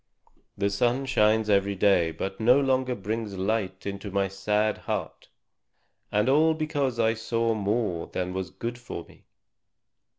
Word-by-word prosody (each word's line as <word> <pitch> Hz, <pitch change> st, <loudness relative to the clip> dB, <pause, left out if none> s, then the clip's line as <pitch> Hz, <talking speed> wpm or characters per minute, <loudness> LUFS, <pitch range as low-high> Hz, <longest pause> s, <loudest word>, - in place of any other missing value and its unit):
The 100 Hz, 0 st, 0 dB
sun 120 Hz, +6 st, +1 dB
shines 110 Hz, -4 st, +3 dB
every 100 Hz, -1 st, +2 dB
day, 95 Hz, -4 st, +3 dB
but 95 Hz, +4 st, -5 dB
no 125 Hz, +5 st, +5 dB
longer 130 Hz, -2 st, +1 dB
brings 105 Hz, 0 st, -4 dB
light 95 Hz, -1 st, -1 dB
to 100 Hz, 0 st, -5 dB
my 100 Hz, 0 st, 0 dB
sad 105 Hz, +2 st, 0 dB
heart. -, -, -5 dB, 0.8 s
And 105 Hz, +2 st, +2 dB
all 155 Hz, +4 st, +4 dB
because 145 Hz, -5 st, -1 dB
I 110 Hz, 0 st, +3 dB
saw 115 Hz, +1 st, 0 dB
more 105 Hz, -4 st, -1 dB
than 90 Hz, 0 st, -3 dB
was 95 Hz, -2 st, -3 dB
good 120 Hz, +5 st, -5 dB
for 120 Hz, -8 st, -7 dB
me!" -, -, -20 dB
105 Hz, 145 wpm, -27 LUFS, 100-120 Hz, 0.8 s, no